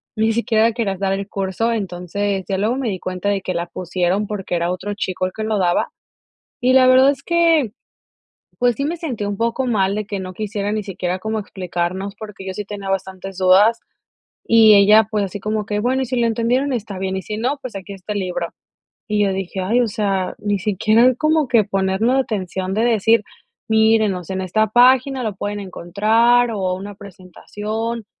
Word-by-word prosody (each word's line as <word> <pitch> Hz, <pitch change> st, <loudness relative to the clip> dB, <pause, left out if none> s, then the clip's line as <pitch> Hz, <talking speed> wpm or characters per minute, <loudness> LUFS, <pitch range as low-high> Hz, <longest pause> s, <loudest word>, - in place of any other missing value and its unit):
ni 220 Hz, +1 st, +2 dB
siquiera 225 Hz, 0 st, +2 dB
quería 215 Hz, -4 st, -1 dB
dar 195 Hz, 0 st, 0 dB
el 195 Hz, 0 st, -3 dB
curso. 195 Hz, +4 st, -2 dB
Entonces, 195 Hz, -1 st, -3 dB
ya 195 Hz, -, -1 dB
luego 220 Hz, +5 st, +1 dB
me 265 Hz, -4 st, -1 dB
di 190 Hz, -3 st, -4 dB
cuenta 185 Hz, +2 st, -3 dB
de 200 Hz, -1 st, 0 dB
que 185 Hz, -1 st, -4 dB
la 170 Hz, 0 st, -1 dB
pusieron, 180 Hz, +3 st, -1 dB
porque 195 Hz, -3 st, -5 dB
era 170 Hz, +1 st, 0 dB
otro 190 Hz, +3 st, -4 dB
chico 185 Hz, -2 st, -2 dB
el 185 Hz, -, -3 dB
que 220 Hz, -, -4 dB
lo 215 Hz, -1 st, 0 dB
daba. 175 Hz, -2 st, +1 dB, 0.7 s
Y 255 Hz, +1 st, +4 dB
la 260 Hz, 0 st, +6 dB
verdad 260 Hz, +1 st, +6 dB
es 275 Hz, -1 st, -2 dB
que, 330 Hz, -, +2 dB, 0.9 s
pues, 245 Hz, -1 st, +2 dB
sí 275 Hz, -, -3 dB
me 325 Hz, +4 st, -2 dB
sentí 265 Hz, -11 st, -4 dB
un 205 Hz, 0 st, -3 dB
poco 235 Hz, +4 st, -1 dB
mal 200 Hz, -5 st, +1 dB
de 215 Hz, 0 st, -3 dB
que 200 Hz, -1 st, -4 dB
no 185 Hz, -1 st, -6 dB
quisiera 205 Hz, 0 st, -3 dB
ni 215 Hz, -1 st, -2 dB
siquiera 185 Hz, -1 st, -3 dB
como 220 Hz, +3 st, -2 dB
explicarnos, 190 Hz, 0 st, -4 dB
porque 210 Hz, -3 st, -9 dB
yo 190 Hz, -, -4 dB
sí 205 Hz, +2 st, -5 dB
tenía 200 Hz, -1 st, -6 dB
bastantes 190 Hz, 0 st, -4 dB
dudas, 195 Hz, +5 st, +5 dB, 0.7 s
y 225 Hz, -1 st, +7 dB
ella, 210 Hz, +2 st, +6 dB
pues, 210 Hz, -2 st, 0 dB
así 200 Hz, +2 st, -6 dB
como 215 Hz, +1 st, -2 dB
que: 210 Hz, -1 st, -1 dB
"Bueno, 255 Hz, +4 st, 0 dB
y -, -, -1 dB
si 250 Hz, 0 st, -2 dB
lo 235 Hz, -, +2 dB
entendieron, 245 Hz, +5 st, 0 dB
está 215 Hz, -4 st, -4 dB
bien, 190 Hz, 0 st, -2 dB
y -, -, -3 dB
si 210 Hz, +2 st, -5 dB
no, 255 Hz, +6 st, -1 dB
pues, 255 Hz, -5 st, -7 dB
aquí 195 Hz, +1 st, -7 dB
está 195 Hz, +2 st, -6 dB
el 205 Hz, -, -2 dB
libro". 180 Hz, -2 st, -3 dB, 0.6 s
Y 210 Hz, -1 st, +1 dB
yo 200 Hz, -, +1 dB
dije: 190 Hz, 0 st, -4 dB
"Ay, 225 Hz, +7 st, +2 dB
o 240 Hz, -, +1 dB
sea, 200 Hz, -3 st, -1 dB
ni 205 Hz, -1 st, 0 dB
siquiera 215 Hz, +5 st, +3 dB
como 310 Hz, +2 st, +1 dB
que 230 Hz, -3 st, +4 dB
ponernos 195 Hz, +5 st, +1 dB
la 270 Hz, -, +4 dB
atención" 190 Hz, -5 st, -3 dB
de 220 Hz, +3 st, +1 dB
decir: 225 Hz, -1 st, +3 dB, 0.5 s
"Miren, 220 Hz, -2 st, +3 dB
o 180 Hz, -, -6 dB
sea, 190 Hz, +3 st, -6 dB
en 190 Hz, -, -2 dB
esta 200 Hz, +4 st, +1 dB
página 255 Hz, +2 st, +4 dB
lo 215 Hz, -4 st, -3 dB
pueden 205 Hz, +1 st, -4 dB
encontrar, 215 Hz, +6 st, +2 dB
o, 190 Hz, -4 st, -1 dB
una 200 Hz, +2 st, -7 dB
presentación, 210 Hz, +4 st, -6 dB
205 Hz, 210 wpm, -20 LUFS, 190-230 Hz, 0.9 s, y